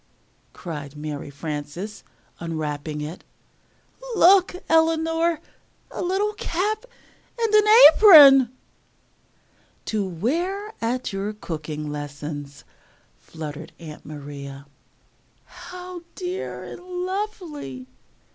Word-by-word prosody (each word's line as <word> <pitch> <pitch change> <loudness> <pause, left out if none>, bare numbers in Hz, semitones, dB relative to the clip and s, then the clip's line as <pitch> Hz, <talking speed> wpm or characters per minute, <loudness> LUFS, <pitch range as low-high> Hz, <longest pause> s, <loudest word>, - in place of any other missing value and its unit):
cried 150 -4 -8
Mary 150 -1 -6
Frances 150 +7 -6 0.4
unwrapping 155 -2 -4
it. 155 +4 -7 0.9
"Look, 375 -1 +5
Eleanor! 325 0 +2 0.5
a - - -5
little 390 +4 0
cap 420 +4 -2 0.5
and 455 -2 0 0.4
apron!" 280 - +9 1.3
"To 215 -2 -1
wear 340 - -2
at 240 0 -2
your 200 +2 -3
cooking 155 -6 -6
lessons," 145 -1 -7 0.6
fluttered 155 0 -8
Aunt 155 -3 -10
Maria. 140 -2 -9 0.8
"How 360 -1 -10
dear 365 +1 -5
and - - -9
lovely!" 360 - -5
210 Hz, 80 wpm, -23 LUFS, -, 1.3 s, apron